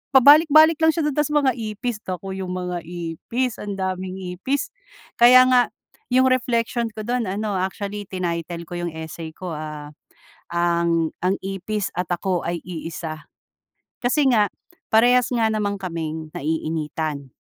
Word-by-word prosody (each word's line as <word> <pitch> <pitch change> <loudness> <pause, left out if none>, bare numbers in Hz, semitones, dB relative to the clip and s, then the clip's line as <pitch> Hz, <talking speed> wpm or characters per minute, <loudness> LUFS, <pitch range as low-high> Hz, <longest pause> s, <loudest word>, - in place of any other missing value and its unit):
pabalik-balik 310 +4 +7
lang 320 0 +6
siya 330 - 0
dun 300 - +1
tas 295 -1 +2
mga 295 -3 +3
ipis 215 +1 -3
nako 190 +1 -4
yung 185 -1 -4
mga 180 -1 -3
ipis 175 +9 -3
ang 205 -1 -4
daming 185 -1 -3 0.2
ipis. 280 - -1 0.5
Kaya 250 +2 +9
nga 250 -1 +4 0.4
yung 255 +1 +4
reflection 235 -2 0
ko 215 - -5
dun 240 -1 -1
ano 200 0 -2
actually 200 +2 -4
tinaytel 170 -2 -3
ko 175 +1 -6
yung 170 -2 -4
essay 160 0 -7
ko, 185 -2 -6
ah, 150 -1 -6 0.6
ang 170 -1 +1
ang 190 +2 +2
ipis 195 +1 -3
at 180 - -1
ako 180 0 -1
ay 170 -1 -2
iisa. 160 -2 -6 0.8
Kasi 275 +3 +3
nga, 210 -3 +3 0.4
parehas 245 +2 +5
nga 230 -2 +2
naman 205 -2 -1
kaming 160 -3 -4
naiinitan 155 -2 -3
190 Hz, 145 wpm, -22 LUFS, 170-240 Hz, 0.8 s, Kaya